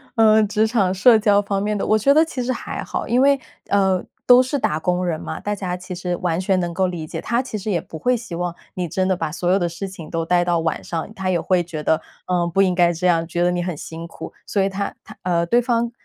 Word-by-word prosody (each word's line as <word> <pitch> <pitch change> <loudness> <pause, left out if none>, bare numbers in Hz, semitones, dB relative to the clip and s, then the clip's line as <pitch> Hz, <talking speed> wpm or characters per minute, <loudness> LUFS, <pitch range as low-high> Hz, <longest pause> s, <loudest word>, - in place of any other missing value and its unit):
呃， 220 -1 +5
职 210 +1 +1
场 205 -5 +1
社 225 +5 +6
交 205 -2 +4
方 200 -1 -2
面 210 +1 -1
的， - - -2
我 215 - +3
觉 275 +6 +4
得 310 +2 +6
其 260 -6 -4
实 250 - -1
还 250 - -5
好， - - -4
因 245 +2 +3
为， 280 0 +4 0.3
呃， 190 -2 +2 0.2
都 250 0 +8
是 260 +3 -1
打 155 -9 0
工 180 +2 0
人 165 -3 -1
嘛， - - -6
大 205 - -2
家 185 -3 -3
其 180 +1 -8
实 180 0 -2
完 170 -2 -1
全 190 0 +1
能 175 -1 -2
够 185 +2 +1
理 175 -3 -5
解。 - - -5
他 235 +2 0
其 255 -4 -5
实 210 +1 -5
也 170 -4 0
不 160 - -9
会 250 +9 +2
希 225 -7 -6
望 175 0 -3 0.2
你 180 -1 -2
真 185 +3 -1
的 190 - +2
把 160 -3 -3
所 175 +2 -1
有 195 - +3
的 175 - 0
事 170 +4 -5
情 175 -5 -10
都 165 -1 -2
带 175 +1 +2
到 175 -1 +1
晚 160 0 -2
上， 170 +5 -4
他 190 -3 -3
也 180 -2 +1
会 180 +1 +1
觉 160 -3 -6
得， 160 - +2 0.3
呃， 175 -1 +1
不 170 +3 +2
应 185 -2 +3
该 175 -1 +4
这 175 +2 -1
样， 165 -2 +2
觉 175 +1 -1
得 175 - +3
你 175 0 -1
很 175 -2 -3
辛 165 +3 -8
苦， - - -9
所 200 - 0
以 195 - +2
他 200 +1 -3
他 215 - -13
呃， 170 -1 +1
对 240 +8 +3
方 235 -1 0
185 Hz, 300 characters per minute, -21 LUFS, 175-215 Hz, 0.3 s, 都